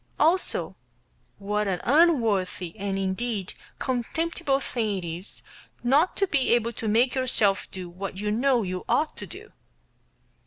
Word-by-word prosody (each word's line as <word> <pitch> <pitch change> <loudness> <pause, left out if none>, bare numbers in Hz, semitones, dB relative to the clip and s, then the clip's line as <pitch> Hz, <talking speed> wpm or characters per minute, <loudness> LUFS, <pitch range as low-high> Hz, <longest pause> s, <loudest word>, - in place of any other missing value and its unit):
also 335 +5 +2 0.6
what 210 +1 -1
an 185 -2 0
unworthy 230 - +2
and, 200 -2 -2
indeed, 195 +1 -2 0.2
contemptible 275 +3 -1
thing 220 -7 -2
it 180 - -5
is 170 +4 -5 0.4
not 285 +9 +3
to 395 - +3
be 270 -9 +2
able 235 0 0
to 225 0 -4
make 235 +4 +3
yourself 230 -7 +2
do 185 -1 -7
what 190 +2 -6
you 210 +1 -1
know 245 +1 +2
you 185 -1 -4
ought 310 - +1
to - - -7
do. - - -11
225 Hz, 145 wpm, -26 LUFS, 195-265 Hz, 0.6 s, not